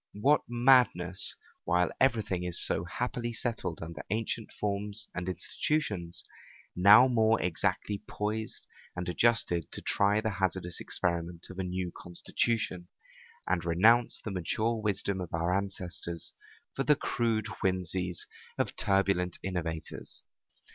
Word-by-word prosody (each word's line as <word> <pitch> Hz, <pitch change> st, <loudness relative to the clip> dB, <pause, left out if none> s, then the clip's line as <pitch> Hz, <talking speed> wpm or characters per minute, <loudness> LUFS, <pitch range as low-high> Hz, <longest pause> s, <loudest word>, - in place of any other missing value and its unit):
What 135 Hz, +8 st, +4 dB
madness, 120 Hz, -8 st, +3 dB, 0.3 s
while 90 Hz, -1 st, +2 dB
every 120 Hz, -5 st, +3 dB
thing 95 Hz, -3 st, -2 dB
is 90 Hz, -1 st, +1 dB
so 85 Hz, -, +2 dB
happily 120 Hz, +5 st, -3 dB
settled 115 Hz, -8 st, -3 dB
under 80 Hz, -1 st, -7 dB
ancient 110 Hz, +2 st, -2 dB
forms 105 Hz, +1 st, -2 dB
and 90 Hz, 0 st, -3 dB
institutions, 95 Hz, -, -2 dB, 0.5 s
now 105 Hz, +7 st, +8 dB
more 115 Hz, -3 st, +3 dB
exactly 95 Hz, +3 st, -1 dB
poised 110 Hz, +1 st, -3 dB, 0.3 s
and 90 Hz, 0 st, -4 dB
adjusted, 90 Hz, -, +2 dB
to -, -, -5 dB
try 100 Hz, +1 st, +2 dB
the 110 Hz, 0 st, -1 dB
hazardous 95 Hz, -2 st, -1 dB
experiment 85 Hz, -1 st, -1 dB
of 95 Hz, -, -9 dB
a -, -, 0 dB
new 90 Hz, -1 st, -3 dB
constitution, 90 Hz, +1 st, -2 dB, 0.6 s
and 90 Hz, -2 st, 0 dB
renounce 110 Hz, +8 st, +4 dB
the 105 Hz, -, -6 dB
mature 110 Hz, +5 st, -1 dB
wisdom 100 Hz, -2 st, -1 dB
of 85 Hz, -2 st, -4 dB
our 85 Hz, +2 st, +1 dB
ancestors 90 Hz, -4 st, -2 dB, 0.4 s
for 135 Hz, -, -1 dB
the 150 Hz, +1 st, +5 dB
crude 115 Hz, -6 st, 0 dB, 0.2 s
whimseys 90 Hz, -1 st, -1 dB, 0.3 s
of -, -, -1 dB
turbulent 95 Hz, -3 st, +2 dB
innovators! 85 Hz, -4 st, -4 dB
95 Hz, 125 wpm, -30 LUFS, 90-110 Hz, 0.6 s, now